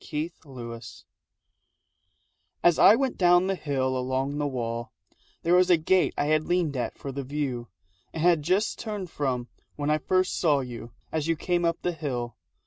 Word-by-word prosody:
MEETING 155 Hz, +2 st, -2 dB
AND 135 Hz, -3 st, -13 dB, 0.3 s
PASSING 115 Hz, -, -12 dB, 1.6 s
As 175 Hz, -2 st, +4 dB
I 215 Hz, -, +8 dB
went 265 Hz, +1 st, -1 dB
down 175 Hz, 0 st, +5 dB
the 195 Hz, -, +1 dB
hill 135 Hz, -6 st, -1 dB
along 130 Hz, +3 st, -1 dB
the 145 Hz, -, 0 dB
wall 120 Hz, -3 st, -4 dB, 0.5 s
There 170 Hz, -, +2 dB
was 180 Hz, 0 st, +5 dB
a 175 Hz, -, +6 dB
gate 180 Hz, +4 st, +2 dB
I -, -, +1 dB
had 155 Hz, +1 st, +2 dB
leaned 175 Hz, -5 st, +1 dB
at 125 Hz, -, -3 dB
for 140 Hz, -, -6 dB
the 140 Hz, +1 st, -4 dB
view 135 Hz, -3 st, -3 dB, 0.4 s
And 160 Hz, -, -4 dB
had 170 Hz, -3 st, +4 dB
just 185 Hz, +8 st, 0 dB
turned 205 Hz, -6 st, -5 dB
from 125 Hz, -4 st, -2 dB, 0.3 s
when 145 Hz, 0 st, -1 dB
I 155 Hz, -, +2 dB
first 185 Hz, +4 st, +1 dB
saw 150 Hz, -5 st, +3 dB
you 120 Hz, -2 st, -8 dB, 0.2 s
As 160 Hz, -1 st, -1 dB
you 165 Hz, -, +2 dB
came 175 Hz, +2 st, -1 dB
up 170 Hz, -1 st, 0 dB
the 180 Hz, -, +1 dB
hill. 125 Hz, -7 st, -4 dB
150 Hz, 185 wpm, -27 LUFS, 130-175 Hz, 1.6 s, I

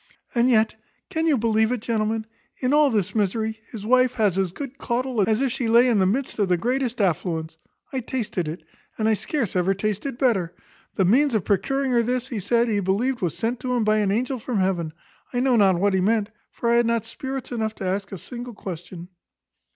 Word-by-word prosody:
And 240 Hz, +1 st, +3 dB
yet, 220 Hz, -2 st, +3 dB, 0.4 s
can 320 Hz, +1 st, 0 dB
you 300 Hz, -4 st, +4 dB
believe 220 Hz, 0 st, +2 dB
it, 250 Hz, -, 0 dB
gentlemen? 220 Hz, -1 st, -1 dB, 0.3 s
in 255 Hz, +2 st, 0 dB
all 300 Hz, -1 st, +5 dB
this 210 Hz, -5 st, 0 dB
misery 220 Hz, +1 st, -1 dB
his 210 Hz, -3 st, -7 dB
wife 255 Hz, +1 st, +4 dB
has 210 Hz, -7 st, +1 dB
as 190 Hz, -2 st, 0 dB
good 275 Hz, +5 st, -7 dB
caudle 240 Hz, -4 st, 0 dB
as 220 Hz, +3 st, +2 dB
if 270 Hz, -2 st, +1 dB
she 250 Hz, -2 st, -2 dB
lay 235 Hz, +2 st, +6 dB
in 230 Hz, -4 st, +3 dB
the 190 Hz, -, +3 dB
midst 250 Hz, +4 st, -1 dB
of 200 Hz, -3 st, +2 dB
the 180 Hz, -, +3 dB
greatest 250 Hz, +3 st, -1 dB
affluence; 165 Hz, -4 st, -1 dB, 0.3 s
I 265 Hz, -, 0 dB
tasted 225 Hz, -8 st, -3 dB
it, 160 Hz, +4 st, -6 dB, 0.3 s
and 220 Hz, -, +1 dB
I 220 Hz, -, +4 dB
scarce 230 Hz, -, -2 dB
ever 185 Hz, +2 st, +2 dB
tasted 215 Hz, +6 st, -2 dB
better. 190 Hz, -10 st, +1 dB, 0.4 s
The 190 Hz, -, +2 dB
means 255 Hz, +6 st, +3 dB
of 210 Hz, -, 0 dB
procuring 270 Hz, +7 st, +1 dB
her 240 Hz, -1 st, +4 dB
this, 250 Hz, +2 st, -1 dB
he 230 Hz, -, -3 dB
said, 235 Hz, +5 st, +2 dB
he 210 Hz, -3 st, +1 dB
believed 215 Hz, +7 st, 0 dB
was 175 Hz, -4 st, -1 dB
sent 230 Hz, +1 st, -2 dB
him 250 Hz, -2 st, 0 dB
by 215 Hz, 0 st, +3 dB
an 205 Hz, -2 st, +1 dB
angel 250 Hz, +5 st, 0 dB
from 230 Hz, 0 st, -3 dB
heaven. 185 Hz, -4 st, 0 dB, 0.4 s
I 245 Hz, -, 0 dB
know 255 Hz, 0 st, +3 dB
not 195 Hz, -5 st, +4 dB
what 200 Hz, +1 st, +2 dB
he 190 Hz, -, +2 dB
meant; 215 Hz, +2 st, +1 dB, 0.2 s
for 235 Hz, -, -4 dB
I 235 Hz, -, +5 dB
had 240 Hz, -1 st, +3 dB
not 230 Hz, -2 st, 0 dB
spirits 265 Hz, +3 st, -6 dB
enough 220 Hz, -2 st, -2 dB
to 195 Hz, -, -6 dB
ask 195 Hz, +1 st, -2 dB
a 195 Hz, -, -5 dB
single 240 Hz, +4 st, -8 dB
question. 175 Hz, -2 st, -7 dB
225 Hz, 220 wpm, -24 LUFS, 195-250 Hz, 0.4 s, lay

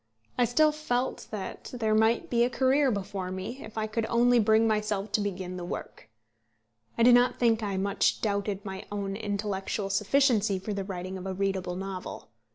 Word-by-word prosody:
I 245 Hz, -, +3 dB
still 305 Hz, +6 st, +4 dB
felt 260 Hz, -5 st, -2 dB
that 205 Hz, -3 st, -6 dB
there 220 Hz, -3 st, 0 dB
might 220 Hz, +2 st, +3 dB
be 235 Hz, -1 st, +4 dB
a 245 Hz, -, +2 dB
career 265 Hz, +3 st, +3 dB
before 200 Hz, -3 st, -3 dB
me, 190 Hz, +8 st, -6 dB
if 220 Hz, 0 st, -11 dB
I 215 Hz, -, 0 dB
could 220 Hz, +1 st, -2 dB
only 240 Hz, +1 st, +4 dB
bring 220 Hz, +1 st, +4 dB
myself 210 Hz, -1 st, -1 dB
to 210 Hz, -, +1 dB
begin 185 Hz, -2 st, -4 dB
the 180 Hz, -, -5 dB
work. 175 Hz, -9 st, -7 dB, 0.9 s
I 230 Hz, -, +3 dB
do 245 Hz, +1 st, +8 dB
not 245 Hz, +1 st, +4 dB
think 230 Hz, -2 st, +2 dB
I 200 Hz, -3 st, -2 dB
much 200 Hz, +1 st, +1 dB
doubted 200 Hz, -1 st, -2 dB
my 190 Hz, 0 st, -6 dB
own 200 Hz, -1 st, -3 dB
intellectual 205 Hz, -1 st, -3 dB
sufficiency 210 Hz, 0 st, +2 dB
for 200 Hz, +3 st, -4 dB
the 200 Hz, -1 st, -3 dB
writing 185 Hz, -1 st, -5 dB
of 185 Hz, -, -6 dB
a 190 Hz, -, -3 dB
readable 190 Hz, -2 st, -1 dB
novel. 190 Hz, -6 st, -6 dB
210 Hz, 185 wpm, -28 LUFS, 195-235 Hz, 0.9 s, do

